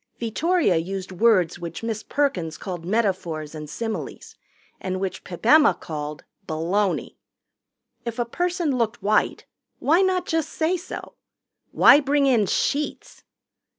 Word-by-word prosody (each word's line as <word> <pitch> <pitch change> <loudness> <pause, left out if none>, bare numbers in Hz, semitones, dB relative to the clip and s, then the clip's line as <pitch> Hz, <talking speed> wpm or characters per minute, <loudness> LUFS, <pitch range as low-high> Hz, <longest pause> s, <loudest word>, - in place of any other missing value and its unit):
Vittoria 280 - +1
used 190 +3 -4
words 185 -4 +3
which 170 +3 -7
Miss 225 -2 -2
Perkins 180 - -1
called 175 -4 -6
metaphors 180 -7 -1
and 150 -1 -7
similes 225 +7 -5 0.4
and 185 0 -3
which 190 -1 -4
Pip 180 +3 -9
Emma 300 +4 +6
called 150 -1 -6 0.2
baloney. 180 +5 -1 0.9
If 235 -1 -5
a 240 - 0
person 345 +2 -1
looked 230 -2 -1
white, 210 +1 +1 0.3
why 325 +6 +3
not 375 -1 +1
just 325 -2 -1
say 325 +3 0
so? 360 +1 -7 0.6
Why 285 - +7
bring 285 0 +2
in 235 -7 +3
sheets? 290 +9 -2
215 Hz, 130 wpm, -24 LUFS, 175-285 Hz, 0.9 s, Why